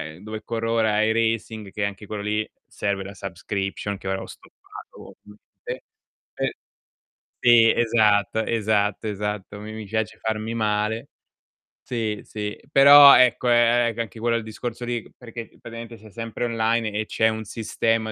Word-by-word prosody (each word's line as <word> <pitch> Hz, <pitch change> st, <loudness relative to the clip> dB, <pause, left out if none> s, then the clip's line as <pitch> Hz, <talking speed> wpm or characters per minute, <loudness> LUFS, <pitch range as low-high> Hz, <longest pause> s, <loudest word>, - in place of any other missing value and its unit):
è -, -, -16 dB
dove 110 Hz, +1 st, -7 dB
corro 115 Hz, 0 st, -3 dB
ora 110 Hz, -2 st, +2 dB
è 110 Hz, +1 st, +2 dB
"Racing" 110 Hz, -2 st, -1 dB
che 105 Hz, -, -3 dB
anche 100 Hz, +1 st, -4 dB
quello 105 Hz, 0 st, -5 dB
lì 105 Hz, +1 st, -2 dB, 0.2 s
serve 100 Hz, -1 st, -3 dB
la 100 Hz, +1 st, -9 dB
subscription 95 Hz, +1 st, -4 dB
che 95 Hz, -, -9 dB
ora 95 Hz, 0 st, -2 dB
ho -, -, -8 dB
stoppato -, -, -14 dB
ovviamente, 105 Hz, 0 st, -10 dB, 0.5 s
e -, -, -2 dB, 0.8 s
sì, 115 Hz, -2 st, +6 dB
esatto, 110 Hz, -1 st, +2 dB
esatto, 105 Hz, -2 st, 0 dB
esatto 105 Hz, 0 st, -4 dB
mi 110 Hz, +1 st, -8 dB
mi 110 Hz, -1 st, -7 dB
piace 110 Hz, +2 st, -3 dB
farmi 110 Hz, +1 st, -3 dB
male. 110 Hz, 0 st, -1 dB, 0.8 s
Sì, 110 Hz, -4 st, -2 dB
sì, 105 Hz, -1 st, -6 dB
però 140 Hz, +1 st, +10 dB
ecco 125 Hz, 0 st, +4 dB
è 120 Hz, 0 st, +4 dB
è -, -, -4 dB
c 115 Hz, -, -11 dB
anche 115 Hz, -1 st, -5 dB
quello 115 Hz, 0 st, +1 dB
il 115 Hz, -, -4 dB
discorso 115 Hz, +2 st, -6 dB
lì 120 Hz, -2 st, -2 dB
perché 115 Hz, -1 st, -9 dB
praticamente 115 Hz, 0 st, -9 dB
sei 110 Hz, -1 st, -15 dB
sempre 115 Hz, +1 st, -4 dB
online 115 Hz, -1 st, 0 dB
e 110 Hz, +1 st, -1 dB
c'è 110 Hz, -, +1 dB
un 110 Hz, 0 st, -4 dB
sistema 110 Hz, +1 st, -1 dB
110 Hz, 160 wpm, -23 LUFS, 105-115 Hz, 0.8 s, però